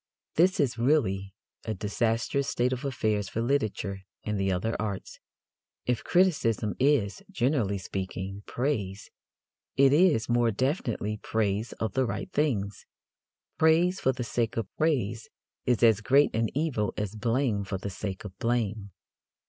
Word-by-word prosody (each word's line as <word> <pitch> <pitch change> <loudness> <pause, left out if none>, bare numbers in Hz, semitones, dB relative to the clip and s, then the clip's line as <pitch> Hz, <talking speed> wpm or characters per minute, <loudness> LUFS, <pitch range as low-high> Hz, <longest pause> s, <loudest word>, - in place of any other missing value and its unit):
This 180 +3 +3
is 125 -5 +1
really 110 -8 +2 0.3
a 110 - -3
disastrous 115 +6 0
state 125 +1 +1
of 130 +2 -4
affairs 110 -7 -1
for - - -3
literature 110 -6 -1 0.2
and 105 -1 -2
the 95 0 +1
other 95 +5 -1
arts. 100 -3 -5 0.7
If 125 -2 0
criticism 130 - +2
is, 130 -8 +2
generally 120 -6 +1
speaking, 95 +1 -5
praise, 105 -7 -2 0.7
it 135 0 +6
is, 150 -8 +4
more 120 -1 +3
definitely, 115 - -1
praise 110 0 -1
of 110 -3 -3
the 130 -1 +1
right - - -4
things. 105 -10 -1 0.7
Praise 170 +4 +4
for 130 - +2
the 125 -1 -4
sake 115 -1 -1
of 115 - -4
praise 120 -8 0 0.4
is 125 -1 +2
as 110 -3 +5
great 140 +6 +4
an 115 0 +2
evil 130 -10 0
as 105 -1 -2
blame 115 -1 0
for 95 0 -3
the 100 +1 -5
sake 95 0 -5
of 95 - -8
blame. 110 -3 -1
115 Hz, 145 wpm, -28 LUFS, 100-135 Hz, 0.7 s, it